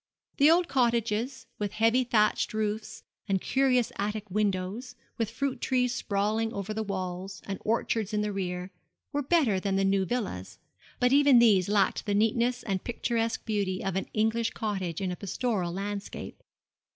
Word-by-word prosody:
The 285 Hz, +2 st, +6 dB
old 340 Hz, +1 st, +4 dB
cottages, 235 Hz, -1 st, 0 dB
with 205 Hz, -1 st, -2 dB
heavy 230 Hz, +3 st, +3 dB
thatched 215 Hz, -3 st, +1 dB
roofs 215 Hz, 0 st, -3 dB, 0.3 s
and 195 Hz, -1 st, +2 dB
curious 255 Hz, +1 st, +2 dB
attic 210 Hz, 0 st, -3 dB
windows, 210 Hz, +4 st, -1 dB, 0.2 s
with 225 Hz, -2 st, 0 dB
fruit 265 Hz, +4 st, -3 dB
trees 250 Hz, -1 st, +1 dB
sprawling 215 Hz, 0 st, 0 dB
over 200 Hz, +1 st, -4 dB
the 220 Hz, -, -2 dB
walls, 190 Hz, -1 st, -4 dB
and 195 Hz, -1 st, -4 dB
orchards 220 Hz, -1 st, 0 dB
in 210 Hz, -1 st, 0 dB
the 210 Hz, -, -1 dB
rear, 180 Hz, -1 st, -3 dB, 0.4 s
were 290 Hz, -, +1 dB
better 270 Hz, -, +2 dB
than 195 Hz, 0 st, -1 dB
the 195 Hz, 0 st, +2 dB
new 195 Hz, 0 st, +2 dB
villas; 200 Hz, -, -4 dB, 0.4 s
but 250 Hz, +1 st, +3 dB
even 285 Hz, -2 st, +6 dB
these 205 Hz, -6 st, +5 dB
lacked 205 Hz, 0 st, +1 dB
the 205 Hz, -, +1 dB
neatness 235 Hz, +3 st, +1 dB
and 195 Hz, -3 st, -2 dB
picturesque 230 Hz, -1 st, -1 dB
beauty 200 Hz, -4 st, -1 dB
of 195 Hz, -2 st, -1 dB
an 195 Hz, -, -2 dB
English 225 Hz, +1 st, +1 dB
cottage 190 Hz, -6 st, -3 dB
in 185 Hz, -2 st, -1 dB
a -, -, -3 dB
pastoral 200 Hz, -2 st, -2 dB
landscape. 200 Hz, +2 st, -5 dB
215 Hz, 165 wpm, -28 LUFS, 195-235 Hz, 0.4 s, The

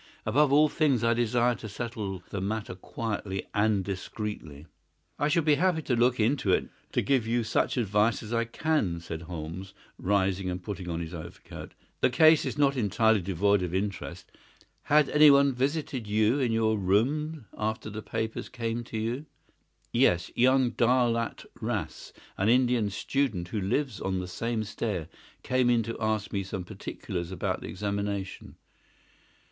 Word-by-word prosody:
Above 140 Hz, +6 st, +3 dB
all 150 Hz, +2 st, +6 dB
things 145 Hz, -7 st, +1 dB
I 115 Hz, 0 st, +4 dB
desire 120 Hz, +1 st, +2 dB
to 110 Hz, -2 st, -8 dB
settle 100 Hz, -4 st, -5 dB
the 100 Hz, -, -3 dB
matter 105 Hz, 0 st, -3 dB
quietly 100 Hz, 0 st, -4 dB
and 105 Hz, -2 st, +2 dB
discreetly." 95 Hz, -6 st, -5 dB, 0.5 s
"I 145 Hz, -, +2 dB
shall 165 Hz, +2 st, +2 dB
be 150 Hz, 0 st, +4 dB
happy 180 Hz, -4 st, +2 dB
to 125 Hz, -, 0 dB
look 120 Hz, +1 st, +2 dB
into 110 Hz, -2 st, +2 dB
it -, -, +6 dB
and -, -, -7 dB, 0.2 s
to -, -, +1 dB
give 130 Hz, -5 st, +1 dB
you 120 Hz, +1 st, +1 dB
such 110 Hz, +4 st, 0 dB
advice 105 Hz, 0 st, +2 dB
as 110 Hz, +2 st, -6 dB
I 115 Hz, 0 st, +1 dB
can," 115 Hz, -, 0 dB
said 80 Hz, -1 st, -6 dB
Holmes, 85 Hz, +3 st, -7 dB, 0.2 s
rising 95 Hz, -1 st, +1 dB
and 90 Hz, 0 st, -4 dB
putting 95 Hz, -3 st, -5 dB
on 85 Hz, 0 st, -2 dB
his 85 Hz, +1 st, -6 dB
overcoat. 85 Hz, +1 st, -9 dB, 0.2 s
"The -, -, +3 dB
case 155 Hz, +4 st, +5 dB
is -, -, -4 dB
not 140 Hz, -1 st, +3 dB
entirely 110 Hz, -2 st, +2 dB
devoid 100 Hz, +2 st, +2 dB
of 90 Hz, 0 st, -2 dB
interest. 100 Hz, 0 st, -4 dB, 0.5 s
Had 150 Hz, 0 st, +4 dB
anyone 140 Hz, -2 st, +6 dB
visited 135 Hz, -2 st, -2 dB
you 110 Hz, +5 st, +2 dB
in 125 Hz, -4 st, +1 dB
your 110 Hz, -1 st, +2 dB
room 135 Hz, -, 0 dB
after 110 Hz, 0 st, -3 dB
the 110 Hz, +2 st, -5 dB
papers 110 Hz, +1 st, -4 dB
came 115 Hz, -1 st, -3 dB
to 115 Hz, -, -6 dB
you?" 120 Hz, +7 st, -3 dB, 0.7 s
"Yes; 85 Hz, 0 st, +3 dB
young 130 Hz, 0 st, +4 dB
Daulat 120 Hz, -1 st, +1 dB, 0.2 s
Ras, -, -, -4 dB, 0.3 s
an 100 Hz, +3 st, +2 dB
Indian 120 Hz, -3 st, +3 dB
student 100 Hz, -4 st, -1 dB
who 105 Hz, -, -2 dB
lives 120 Hz, +3 st, -1 dB
on 95 Hz, -1 st, -1 dB
the 90 Hz, 0 st, -3 dB
same 110 Hz, +5 st, -2 dB
stair, 105 Hz, -5 st, -3 dB, 0.3 s
came 130 Hz, -1 st, +2 dB
in 120 Hz, -2 st, +3 dB
to 115 Hz, +2 st, -5 dB
ask 110 Hz, 0 st, -1 dB
me 100 Hz, -, 0 dB
some 95 Hz, -1 st, -5 dB
particulars 95 Hz, -2 st, -6 dB
about 95 Hz, -, -2 dB
the -, -, -6 dB
examination." 100 Hz, -1 st, -4 dB
110 Hz, 165 wpm, -28 LUFS, 95-125 Hz, 0.7 s, all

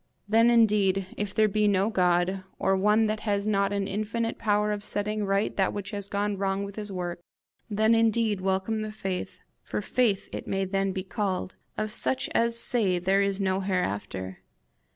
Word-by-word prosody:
Then 225 Hz, +3 st, +5 dB
indeed, 205 Hz, -5 st, +3 dB
if 205 Hz, -1 st, -3 dB
there 215 Hz, 0 st, +4 dB
be 210 Hz, +1 st, +1 dB
no 200 Hz, +2 st, +2 dB
God, 180 Hz, 0 st, +1 dB
or 195 Hz, -, +2 dB
one 210 Hz, +3 st, +3 dB
that 215 Hz, 0 st, -1 dB
has 205 Hz, -2 st, -1 dB
not 200 Hz, -2 st, +1 dB
an 200 Hz, -1 st, -1 dB
infinite 220 Hz, +3 st, -2 dB
power 210 Hz, -1 st, +1 dB
of 205 Hz, -1 st, -3 dB
setting 210 Hz, +1 st, -1 dB
right 195 Hz, +1 st, 0 dB
that 190 Hz, -2 st, +2 dB
which 205 Hz, 0 st, -5 dB
has 200 Hz, -1 st, -4 dB
gone 205 Hz, 0 st, -1 dB
wrong 195 Hz, 0 st, 0 dB
with 200 Hz, 0 st, -7 dB
his 210 Hz, -2 st, -5 dB
work, 175 Hz, -2 st, -4 dB, 0.5 s
then 220 Hz, +2 st, +3 dB
indeed 225 Hz, -3 st, +2 dB
welcome 190 Hz, +3 st, 0 dB
the 215 Hz, 0 st, -4 dB
faith, 190 Hz, -4 st, -5 dB, 0.2 s
for -, -, -4 dB
faith 230 Hz, -6 st, +1 dB
it -, -, -6 dB
may 195 Hz, 0 st, 0 dB
then 195 Hz, 0 st, 0 dB
be 190 Hz, 0 st, -4 dB
called, 190 Hz, -1 st, -3 dB, 0.2 s
of 215 Hz, 0 st, -2 dB
such 130 Hz, -8 st, 0 dB
as 235 Hz, 0 st, +2 dB
say 215 Hz, -6 st, +2 dB
there 190 Hz, +3 st, +2 dB
is 200 Hz, 0 st, 0 dB
no 190 Hz, -1 st, +1 dB
hereafter! 100 Hz, -, -3 dB
200 Hz, 185 wpm, -27 LUFS, 190-215 Hz, 0.5 s, Then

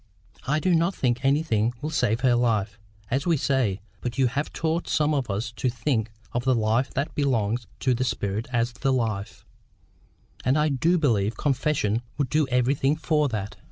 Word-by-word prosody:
I 150 Hz, +3 st, +2 dB
do 180 Hz, +3 st, +2 dB
not 170 Hz, +3 st, +2 dB
think 125 Hz, 0 st, 0 dB
anything 130 Hz, -5 st, +2 dB
will 155 Hz, +2 st, -4 dB
save 125 Hz, -6 st, +1 dB
her 130 Hz, -2 st, +4 dB
life, 110 Hz, -4 st, +1 dB, 0.3 s
as 135 Hz, +6 st, 0 dB
we 165 Hz, -2 st, +3 dB
say, 125 Hz, -8 st, 0 dB, 0.2 s
but 120 Hz, -1 st, -4 dB
you 135 Hz, -, +4 dB
have 140 Hz, +5 st, -1 dB
taught 165 Hz, +1 st, -1 dB
some 155 Hz, 0 st, +2 dB
of 135 Hz, -5 st, -1 dB
us 105 Hz, +5 st, -2 dB
to 130 Hz, -, +1 dB
think 120 Hz, -2 st, -1 dB, 0.2 s
of 120 Hz, -, -2 dB
the 130 Hz, 0 st, +3 dB
life 115 Hz, +3 st, +1 dB
that 140 Hz, +3 st, -1 dB
belongs 120 Hz, -5 st, 0 dB
to 130 Hz, -, +2 dB
the 125 Hz, +1 st, 0 dB
spirit 105 Hz, -3 st, -2 dB
as 120 Hz, -1 st, +1 dB
THE 135 Hz, +2 st, 0 dB
life; 110 Hz, -6 st, -2 dB, 1.0 s
and 130 Hz, +3 st, +2 dB
I 150 Hz, 0 st, +3 dB
do 160 Hz, +6 st, +2 dB
believe 115 Hz, -, +1 dB
confession 130 Hz, -6 st, 0 dB, 0.2 s
would 140 Hz, -4 st, 0 dB
do 155 Hz, -2 st, +2 dB
everything 130 Hz, +3 st, +2 dB
for 155 Hz, -2 st, +1 dB
that." 105 Hz, -3 st, -4 dB
125 Hz, 185 wpm, -25 LUFS, 115-145 Hz, 1.0 s, her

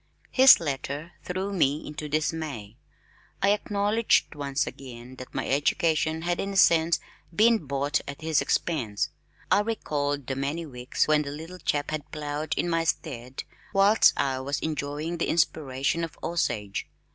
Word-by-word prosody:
His 265 Hz, 0 st, +8 dB
letter 145 Hz, +1 st, -4 dB
threw 190 Hz, +2 st, -3 dB
me 150 Hz, -5 st, +1 dB
into 150 Hz, 0 st, -6 dB
dismay. 155 Hz, -8 st, -2 dB, 0.6 s
I 195 Hz, -, +3 dB
acknowledged 210 Hz, +2 st, +1 dB
once 140 Hz, -1 st, -1 dB
again 125 Hz, -1 st, -9 dB
that 130 Hz, -, -10 dB
my -, -, -2 dB
education 155 Hz, +2 st, +1 dB
had 175 Hz, 0 st, -1 dB
in 200 Hz, 0 st, -2 dB
a -, -, -2 dB
sense 165 Hz, -2 st, +5 dB, 0.4 s
been 220 Hz, -6 st, +4 dB
bought 140 Hz, +1 st, 0 dB
at 140 Hz, +3 st, -7 dB
his 160 Hz, -1 st, +2 dB
expense. 120 Hz, -12 st, -1 dB, 0.4 s
I -, -, +6 dB
recalled 145 Hz, -, -2 dB
the 135 Hz, -, -3 dB
many 145 Hz, +5 st, -2 dB
weeks 125 Hz, -3 st, -1 dB
when 155 Hz, -1 st, +4 dB
the 145 Hz, -, -4 dB
little 160 Hz, +5 st, -8 dB
chap 145 Hz, -2 st, -1 dB
had 155 Hz, -2 st, -4 dB
plowed 150 Hz, 0 st, -3 dB
in -, -, 0 dB
my 165 Hz, -1 st, +1 dB
stead 130 Hz, -6 st, -3 dB, 0.3 s
whilst 200 Hz, +3 st, +5 dB
I 135 Hz, -2 st, +1 dB
was 140 Hz, +2 st, -2 dB
enjoying 155 Hz, +2 st, -3 dB
the -, -, 0 dB
inspiration 155 Hz, -1 st, 0 dB
of 165 Hz, -, -6 dB
Osage. 105 Hz, -12 st, -2 dB
155 Hz, 155 wpm, -27 LUFS, 140-170 Hz, 0.6 s, His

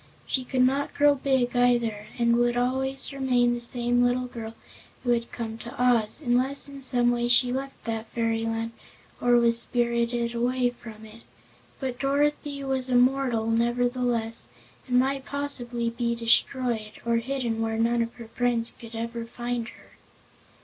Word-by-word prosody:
She 260 Hz, -, -1 dB
could 255 Hz, 0 st, +1 dB
not 275 Hz, +3 st, +1 dB
grow 290 Hz, 0 st, +5 dB
big, 265 Hz, -3 st, 0 dB
either, 240 Hz, -4 st, +2 dB
and 235 Hz, -1 st, +3 dB
would 240 Hz, 0 st, +2 dB
always 265 Hz, +3 st, -1 dB
remain 250 Hz, -3 st, +2 dB
the 240 Hz, -, -3 dB
same 240 Hz, 0 st, +2 dB
little 245 Hz, +1 st, +1 dB
girl 230 Hz, -2 st, -7 dB, 0.5 s
who 245 Hz, -, +1 dB
had 235 Hz, -1 st, 0 dB
come 225 Hz, -1 st, -5 dB
to 235 Hz, -, -9 dB
Oz, 245 Hz, +2 st, +2 dB
unless 255 Hz, +4 st, +1 dB
in 280 Hz, -1 st, -9 dB
some 245 Hz, -2 st, +3 dB
way 240 Hz, 0 st, 0 dB
she 245 Hz, +1 st, +4 dB
left 270 Hz, +1 st, -5 dB
that 225 Hz, -1 st, -3 dB
fairyland 225 Hz, 0 st, -1 dB, 0.5 s
or 245 Hz, 0 st, +4 dB
was 235 Hz, -1 st, +3 dB
spirited 235 Hz, -1 st, 0 dB
away 245 Hz, +1 st, +1 dB
from 220 Hz, -2 st, -12 dB
it. 220 Hz, +1 st, -13 dB, 0.6 s
But 255 Hz, -2 st, -4 dB
Dorothy 285 Hz, 0 st, 0 dB
was 265 Hz, -1 st, -2 dB
a 250 Hz, -, +2 dB
mortal, 250 Hz, -2 st, +3 dB
nevertheless, 240 Hz, 0 st, 0 dB, 0.4 s
and 250 Hz, -1 st, +2 dB
might 270 Hz, +1 st, +1 dB
possibly 245 Hz, -5 st, -2 dB
be 235 Hz, 0 st, -1 dB
destroyed, 230 Hz, -1 st, +1 dB
or 235 Hz, 0 st, +2 dB
hidden 235 Hz, -2 st, -2 dB
where 225 Hz, 0 st, -1 dB
none 235 Hz, +1 st, +2 dB
of 230 Hz, +1 st, -3 dB
her 235 Hz, -2 st, -10 dB
friends 235 Hz, -1 st, 0 dB
could 230 Hz, -1 st, -10 dB
ever 230 Hz, 0 st, -4 dB
find 240 Hz, 0 st, -4 dB
her. -, -, -15 dB
240 Hz, 160 wpm, -26 LUFS, 230-255 Hz, 0.6 s, grow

